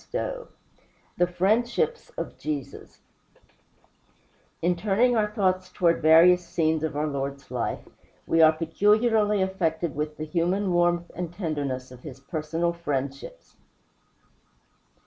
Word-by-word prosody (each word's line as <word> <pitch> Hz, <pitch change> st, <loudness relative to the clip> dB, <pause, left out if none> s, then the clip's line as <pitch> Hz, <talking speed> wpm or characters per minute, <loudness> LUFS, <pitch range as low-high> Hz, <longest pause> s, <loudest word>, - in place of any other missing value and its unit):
XII -, -, -1 dB, 0.9 s
THE 175 Hz, -, +3 dB
FRIENDSHIPS 235 Hz, -, 0 dB
OF -, -, -5 dB
JESUS 145 Hz, -4 st, -6 dB, 1.6 s
In 175 Hz, +1 st, +2 dB
turning 215 Hz, +7 st, +2 dB
our 210 Hz, -2 st, +1 dB
thoughts 185 Hz, -3 st, 0 dB
toward 170 Hz, -2 st, +1 dB
various 170 Hz, +3 st, +6 dB
scenes 160 Hz, -2 st, 0 dB
of 155 Hz, -2 st, -2 dB
our 150 Hz, -, 0 dB
Lord's 140 Hz, -2 st, -5 dB
life, 125 Hz, -2 st, -3 dB, 0.4 s
we 165 Hz, -, +2 dB
are 160 Hz, -1 st, +8 dB
peculiarly 210 Hz, +5 st, +2 dB
affected 170 Hz, -4 st, -1 dB
with 150 Hz, +1 st, -3 dB
the 155 Hz, -, -4 dB
human 180 Hz, +4 st, 0 dB
warmth 175 Hz, 0 st, +1 dB
and 175 Hz, -2 st, -4 dB
tenderness 145 Hz, -8 st, -4 dB
of 125 Hz, -, -12 dB
his 135 Hz, -3 st, -10 dB
personal 160 Hz, +4 st, -2 dB
friendships. 140 Hz, -5 st, -5 dB
170 Hz, 120 wpm, -26 LUFS, 155-190 Hz, 1.6 s, are